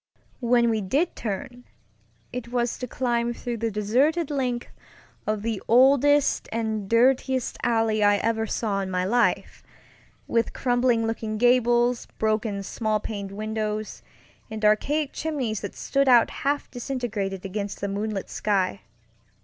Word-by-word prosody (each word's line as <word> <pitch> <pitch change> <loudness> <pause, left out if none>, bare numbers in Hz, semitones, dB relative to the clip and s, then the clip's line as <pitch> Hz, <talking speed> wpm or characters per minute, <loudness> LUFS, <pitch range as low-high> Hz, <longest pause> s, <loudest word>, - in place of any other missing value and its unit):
When 235 -1 +3
we 220 -1 0
did 280 - 0
turn, 245 +4 -5 0.7
it 250 -1 -5
was 240 0 -1
to 250 - -4
climb 240 -1 -1
through 240 0 -4
the 230 +1 -1
deserted 265 +11 +1
length 250 -4 -2 0.6
of 215 -1 -1
the 225 -3 -2
oldest 275 +4 +4
and 220 -3 -2
dirtiest 255 +2 +2
alley 225 -2 +1
I 205 0 +5
ever 225 +1 0
saw 205 -2 -1
in 190 - -4
my 180 0 -1
life, 240 +5 +1 0.7
with 230 -1 0
crumbling 245 -2 +1
looking 225 -1 -3
gables, 240 0 +3
broken 215 -2 0
small 215 +1 -1
paned 200 -2 -5
windows, 215 +1 -3 0.5
and 220 -1 -3
archaic 280 +8 +2
chimneys 265 -10 -2
that 200 - -6
stood 275 -1 +1
out 240 -2 +6
half 285 +1 -2
disintegrated 225 -7 -3
against 200 +1 -4
the 200 - -2
moonlit 200 0 -3
sky. 190 - -1
230 Hz, 135 wpm, -25 LUFS, 210-245 Hz, 0.7 s, out